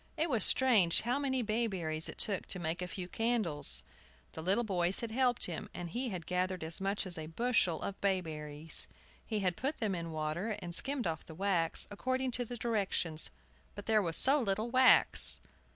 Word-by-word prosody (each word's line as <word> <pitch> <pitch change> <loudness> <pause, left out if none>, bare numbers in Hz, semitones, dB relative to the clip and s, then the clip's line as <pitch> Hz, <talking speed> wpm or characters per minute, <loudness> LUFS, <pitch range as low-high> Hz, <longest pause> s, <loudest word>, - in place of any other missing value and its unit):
It 320 0 -1
was 225 -6 +2
strange 220 -10 +4
how 245 +4 -1
many 265 -3 -1
bayberries 190 -8 -1
it - - -8
took 200 -4 0
to - - -1
make 170 0 -4
a 180 - -3
few 180 0 -7
candles! 210 -10 +1 0.5
The 160 - -8
little 195 +8 +1
boys 185 -3 -1
had 230 -2 -4
helped 245 0 +2
him, 170 -3 -6
and 175 -2 -6
he 250 +4 -3
had 180 -5 -6
gathered 180 -1 -2
as 160 +3 -4
much 195 +1 -1
as 175 -3 0
a 155 - -6
bushel 185 -2 0
of 200 - -6
bayberries. 160 -5 -1 0.4
He 215 -2 -3
had 180 -2 0
put 275 - -3
them 215 -4 -1
in 170 -2 -5
water, 160 +7 -3
and 175 -4 -7
skimmed 270 +5 -1
off 160 -2 -4
the 160 - -10
wax, 180 -3 +2
according 255 +5 -2
to 245 0 -2
the 245 +1 -7
directions; 195 -8 -2 0.5
but - - -9
there 220 -1 +3
was 165 -4 +1
so 275 +2 +4
little 215 +2 -2
wax! 255 0 +7
195 Hz, 195 wpm, -32 LUFS, 170-235 Hz, 0.5 s, wax